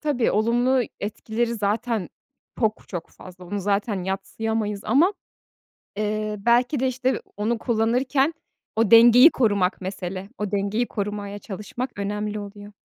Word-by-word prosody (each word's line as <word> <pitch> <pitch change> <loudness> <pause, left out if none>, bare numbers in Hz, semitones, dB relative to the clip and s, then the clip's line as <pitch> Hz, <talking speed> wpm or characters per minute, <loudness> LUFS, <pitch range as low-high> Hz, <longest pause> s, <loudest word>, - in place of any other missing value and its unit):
Tabii, 285 -6 +1
olumlu 240 +4 +2 0.2
etkileri 225 +3 -2
zaten 220 0 -1 0.5
çok 220 -1 0
çok 175 -3 -6
fazla. 180 0 -13
Onu 200 +3 -4
zaten 200 -1 -1
yadsıyamayız 210 +2 -2
ama, 340 +9 +4 0.8
eee, 215 0 -2
belki 240 +6 +2
de 260 - +2
işte 255 +1 -1 0.2
onu 225 +3 0
kullanırken 255 +6 +1 0.4
o 225 -2 +2
dengeyi 240 +6 +9
korumak 205 - +1
mesele. 190 0 -5
O 210 -2 -3
dengeyi 205 +4 0
korumaya 205 -1 -4
çalışmak 210 +5 -6
önemli 210 +1 -3
oluyor. 205 0 -10
215 Hz, 125 wpm, -24 LUFS, 200-240 Hz, 0.8 s, dengeyi